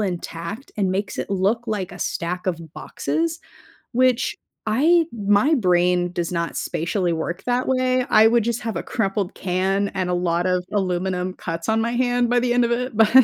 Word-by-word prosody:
intact 180 Hz, +4 st, -4 dB
and 195 Hz, -3 st, +1 dB
makes 195 Hz, +2 st, -2 dB
it -, -, -4 dB
look 200 Hz, +5 st, +1 dB
like 205 Hz, -4 st, -3 dB
a 180 Hz, -, -10 dB
stack 180 Hz, +2 st, -3 dB
of 180 Hz, -3 st, 0 dB, 0.2 s
boxes, 330 Hz, 0 st, -2 dB, 0.5 s
which 255 Hz, 0 st, +2 dB, 0.3 s
I 315 Hz, +9 st, +4 dB
my 205 Hz, +6 st, +3 dB
brain 180 Hz, -, +2 dB
does 175 Hz, -2 st, -2 dB
not 170 Hz, -1 st, -2 dB
spatially 175 Hz, +2 st, -1 dB
work 170 Hz, +3 st, -3 dB
that 245 Hz, +1 st, 0 dB
way. 255 Hz, -1 st, +2 dB
I 215 Hz, +1 st, +7 dB
would 235 Hz, -1 st, +3 dB
just 235 Hz, 0 st, -1 dB
have 225 Hz, -1 st, -4 dB
a -, -, -2 dB
crumpled 195 Hz, -3 st, -2 dB
can 190 Hz, +2 st, 0 dB
and 185 Hz, -2 st, -2 dB
a -, -, +1 dB
lot 175 Hz, 0 st, 0 dB
of 180 Hz, -1 st, +1 dB
aluminum 185 Hz, -2 st, -1 dB
cuts 165 Hz, -2 st, -5 dB
on 220 Hz, 0 st, +2 dB
my 230 Hz, +1 st, 0 dB
hand 245 Hz, -1 st, +1 dB
by 245 Hz, -, +3 dB
the 245 Hz, 0 st, +1 dB
end 245 Hz, 0 st, +4 dB
of 235 Hz, -, 0 dB
it 245 Hz, -1 st, -1 dB
but 220 Hz, -1 st, +5 dB
200 Hz, 190 wpm, -22 LUFS, 180-240 Hz, 0.5 s, I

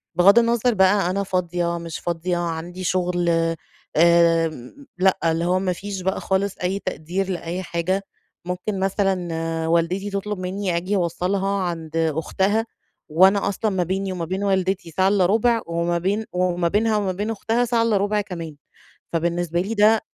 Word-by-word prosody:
بغض 200 Hz, +6 st, +7 dB
النظر 235 Hz, +1 st, +2 dB
بقى 190 Hz, -1 st, +3 dB
أنا 200 Hz, +2 st, 0 dB
فاضية 175 Hz, -2 st, -1 dB
مش 165 Hz, -1 st, -6 dB
فاضية 175 Hz, +1 st, -2 dB
عندي 175 Hz, +2 st, -4 dB
شغل 175 Hz, -1 st, 0 dB, 0.7 s
آآ 170 Hz, 0 st, +5 dB, 0.5 s
لأ، 190 Hz, +1 st, +3 dB
اللي 165 Hz, +1 st, -1 dB
هو 185 Hz, +1 st, +2 dB
ما 185 Hz, -1 st, 0 dB
فيش 195 Hz, +1 st, -6 dB
بقى 190 Hz, +1 st, -1 dB
خالص 195 Hz, +1 st, -1 dB
أي 190 Hz, +2 st, 0 dB
تقدير 185 Hz, +4 st, -3 dB
لأي 180 Hz, 0 st, -3 dB
حاجة 185 Hz, +3 st, -1 dB, 0.4 s
ممكن 180 Hz, +2 st, -3 dB
مثلًا 195 Hz, 0 st, +1 dB, 0.5 s
والدتي 170 Hz, +4 st, +1 dB
تطلب 200 Hz, 0 st, -3 dB
مني 185 Hz, -1 st, -2 dB
آجي 185 Hz, +4 st, -1 dB
أوصلها 185 Hz, +2 st, 0 dB
عند 165 Hz, -3 st, -4 dB
أختها، 175 Hz, +7 st, 0 dB, 0.4 s
وأنا 190 Hz, +5 st, +4 dB
أصلًا 210 Hz, +2 st, -1 dB
ما 185 Hz, -2 st, 0 dB
بيني 190 Hz, +2 st, -2 dB
وما 175 Hz, -2 st, -3 dB
بين 190 Hz, +4 st, -3 dB
والدتي 190 Hz, -3 st, 0 dB
ساعة 185 Hz, +4 st, +2 dB
إلا 195 Hz, -2 st, +3 dB
ربع، 225 Hz, +4 st, +2 dB
وما 170 Hz, +1 st, -1 dB
بين 200 Hz, +5 st, -1 dB
وما 180 Hz, -1 st, 0 dB
بينها 215 Hz, +4 st, +2 dB
وما 200 Hz, -3 st, 0 dB
بين 205 Hz, +4 st, -3 dB
أختها 225 Hz, +3 st, 0 dB
ساعة 235 Hz, -1 st, +1 dB
إلا 225 Hz, -3 st, +2 dB
ربع 205 Hz, +1 st, +1 dB
كمان، 170 Hz, -6 st, -7 dB, 0.6 s
فبالنسبة 170 Hz, +1 st, 0 dB
لي 210 Hz, +4 st, -3 dB
ده 215 Hz, +1 st, +4 dB
185 Hz, 160 wpm, -22 LUFS, 170-200 Hz, 0.7 s, بغض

